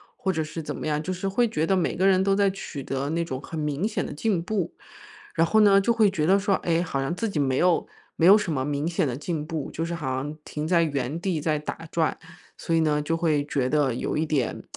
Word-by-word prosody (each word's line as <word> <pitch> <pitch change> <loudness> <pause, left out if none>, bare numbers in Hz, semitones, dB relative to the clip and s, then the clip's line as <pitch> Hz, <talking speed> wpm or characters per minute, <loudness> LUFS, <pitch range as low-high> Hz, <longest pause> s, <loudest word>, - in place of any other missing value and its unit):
或 190 - -1
者 160 - -1
是 155 +1 -5
怎 - - -4
么 - - -5
样。 150 0 0
就 185 - -3
是 185 +2 -3
会 205 +5 +2
觉 160 -4 -1
得 195 - +3
每 185 - 0
个 190 +2 +3
人 190 -1 +4
都 195 - +2
在 200 0 +3
取 170 -7 -7
得 135 +2 -3
那 165 +2 -1
种 130 -4 -5
很 160 +2 -6
明 150 +4 -1
显 220 - -1
的 - - -6
进 180 +4 0
步。 190 0 -2 0.6
然 165 - +4
后 220 +6 +3
呢， 200 -1 +6
就 235 - +2
会 220 -3 +4
觉 165 -6 -1
得 195 +4 +4
说， 195 -1 +2
诶， 170 0 +2
好 140 -6 -2
像 135 +5 -1
自 205 +6 -2
己 165 - -2
没 135 -2 +1
有 180 +1 +3 0.3
没 165 - +2
有 200 +4 +9
什 190 -6 -2
么 130 -2 -1
明 145 +2 -1
显 165 -2 0
的 125 -1 -2
进 150 0 -3
步， 155 -3 -4
就 165 - -2
是 170 +1 -3
好 135 -6 -2
像 140 +3 -3
停 150 0 -4
在 170 +1 +3
原 145 -1 -1
地 175 -4 -1
在 155 0 0
打 160 +2 -6
转， 160 -2 0 0.4
所 165 - -3
以 165 - +4
呢， 150 -1 +2
就 165 +3 -1
会 155 -4 +1
觉 130 -3 0
得 140 -3 +2
有 120 - -2
一 155 - +1
点 145 -6 -1
165 Hz, 290 characters per minute, -25 LUFS, 150-185 Hz, 0.6 s, 有